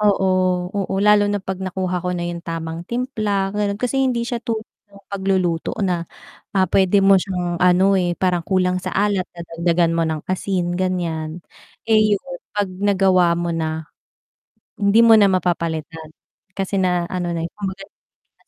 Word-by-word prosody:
Oo, 205 Hz, -2 st, +3 dB, 0.5 s
oo, 195 Hz, -1 st, -2 dB
lalo 210 Hz, 0 st, +5 dB
na 205 Hz, -, 0 dB
'pag 190 Hz, -1 st, -5 dB
nakuha 185 Hz, -1 st, -2 dB
ko 180 Hz, -, -4 dB
na 175 Hz, -, -3 dB
yung 175 Hz, 0 st, -4 dB
tamang 165 Hz, -1 st, -5 dB
timpla, 215 Hz, -6 st, -1 dB
ganon 205 Hz, -1 st, -1 dB
kasi 250 Hz, +4 st, -1 dB
hindi 250 Hz, -3 st, +1 dB
siya 235 Hz, 0 st, -3 dB
tulad 220 Hz, -1 st, -3 dB, 0.2 s
ng 200 Hz, 0 st, -18 dB
pagluluto 190 Hz, -4 st, -1 dB
na 175 Hz, -3 st, -1 dB, 0.5 s
ah, 190 Hz, -, +5 dB
pwede 195 Hz, +1 st, +4 dB
mo 195 Hz, -1 st, +6 dB
siyang 175 Hz, -3 st, -3 dB
ano, 180 Hz, +2 st, +4 dB
eh, 175 Hz, -1 st, -1 dB
parang 180 Hz, -2 st, +1 dB
kulang 185 Hz, -1 st, +1 dB
sa -, -, -5 dB
alat, 200 Hz, -2 st, +1 dB
dagdagan 170 Hz, 0 st, 0 dB
mo 165 Hz, 0 st, +1 dB
ng 155 Hz, -1 st, -4 dB
asin 185 Hz, -1 st, -1 dB
ganiyan, 170 Hz, -3 st, -2 dB, 0.4 s
eh, 215 Hz, -2 st, +4 dB
yun, 200 Hz, -, -12 dB, 0.3 s
pag 205 Hz, -1 st, +1 dB
nagawa 185 Hz, -3 st, +3 dB
mo 170 Hz, 0 st, -2 dB
na 160 Hz, -1 st, -3 dB, 1.0 s
hindi 205 Hz, +3 st, +5 dB
mo 225 Hz, -, +7 dB
na 205 Hz, -2 st, +5 dB
mapapalitan, 165 Hz, -3 st, -2 dB, 0.5 s
kasi 195 Hz, 0 st, -1 dB
na 180 Hz, -2 st, +1 dB
ano 180 Hz, -2 st, -2 dB
na, 165 Hz, -1 st, -2 dB
eh, -, -, -5 dB
kumbaga 195 Hz, -1 st, -5 dB
na 205 Hz, -, -39 dB
185 Hz, 165 wpm, -20 LUFS, 175-200 Hz, 1.0 s, mo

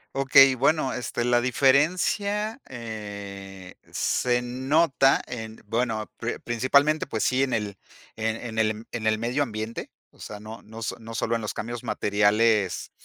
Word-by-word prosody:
Okey, 135 Hz, 0 st, +7 dB
bueno, 135 Hz, +1 st, +1 dB
este, 120 Hz, -1 st, -3 dB
la 120 Hz, 0 st, +3 dB
diferencia, 185 Hz, -, +2 dB
eh, 100 Hz, -5 st, -8 dB, 0.2 s
se 125 Hz, -1 st, +1 dB
nota 135 Hz, +2 st, +3 dB
en, 110 Hz, -2 st, -7 dB
bueno, 115 Hz, -2 st, -1 dB
pri 115 Hz, +1 st, -3 dB
principalmente, 140 Hz, +6 st, +2 dB
pues 110 Hz, -5 st, -2 dB
sí, 130 Hz, +1 st, +2 dB
en 135 Hz, -1 st, +1 dB
el 105 Hz, -3 st, -2 dB, 0.4 s
en 110 Hz, 0 st, -1 dB
en 115 Hz, -2 st, -5 dB
el 110 Hz, 0 st, 0 dB
en 110 Hz, -2 st, -3 dB
el 110 Hz, 0 st, +3 dB
medio 120 Hz, +5 st, -1 dB
ambiente, 110 Hz, -3 st, -4 dB, 0.2 s
o -, -, -25 dB
sea, 105 Hz, -, -8 dB
no 110 Hz, +2 st, -9 dB
no 110 Hz, +1 st, -11 dB
s -, -, -2 dB
no 115 Hz, 0 st, -9 dB
solo 115 Hz, -, -1 dB
en 115 Hz, -, -2 dB
los 105 Hz, -, -4 dB
cambios 120 Hz, +1 st, -5 dB
materiales 105 Hz, -1 st, +2 dB
115 Hz, 155 wpm, -25 LUFS, 110-130 Hz, 0.4 s, Okey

